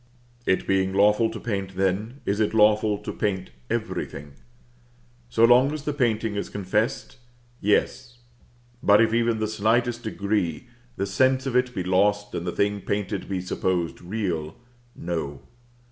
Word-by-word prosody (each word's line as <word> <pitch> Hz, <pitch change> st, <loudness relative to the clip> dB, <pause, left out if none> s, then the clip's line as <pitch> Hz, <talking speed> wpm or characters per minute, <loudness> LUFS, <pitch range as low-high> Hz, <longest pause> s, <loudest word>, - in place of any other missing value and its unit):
It 95 Hz, -, +2 dB
being 95 Hz, 0 st, +1 dB
lawful 105 Hz, +3 st, +4 dB
to -, -, -7 dB
paint 100 Hz, -4 st, -4 dB
then, 95 Hz, +8 st, -1 dB
is 100 Hz, +2 st, 0 dB
it 110 Hz, 0 st, +1 dB
lawful 105 Hz, -1 st, +4 dB
to -, -, -6 dB
paint 95 Hz, -3 st, -2 dB, 0.2 s
everything? 70 Hz, +1 st, -4 dB, 1.0 s
So 115 Hz, -, +4 dB
long 125 Hz, +4 st, +5 dB
as 155 Hz, -2 st, -5 dB
the 150 Hz, -, -2 dB
painting 115 Hz, -5 st, 0 dB
is 100 Hz, -, -3 dB
confessed 105 Hz, +3 st, -2 dB, 0.4 s
yes; 120 Hz, +4 st, 0 dB, 0.6 s
but 100 Hz, 0 st, +5 dB
if, 115 Hz, -1 st, +3 dB
even 115 Hz, 0 st, +2 dB
in 110 Hz, -, -4 dB
the 110 Hz, -, 0 dB
slightest 115 Hz, +3 st, +1 dB
degree, 100 Hz, -7 st, -2 dB, 0.3 s
the 100 Hz, -, -1 dB
sense 130 Hz, +6 st, +2 dB
of 130 Hz, -2 st, -2 dB
it 125 Hz, 0 st, +1 dB
be 90 Hz, -, -1 dB
lost, 105 Hz, +3 st, +1 dB
and 85 Hz, -, -4 dB
the -, -, 0 dB
thing 100 Hz, +2 st, 0 dB
painted 100 Hz, -1 st, -3 dB
be 95 Hz, -2 st, -2 dB
supposed 90 Hz, -1 st, -2 dB
real 85 Hz, -5 st, -3 dB, 0.4 s
no. 80 Hz, -5 st, -4 dB
105 Hz, 155 wpm, -25 LUFS, 95-115 Hz, 1.0 s, long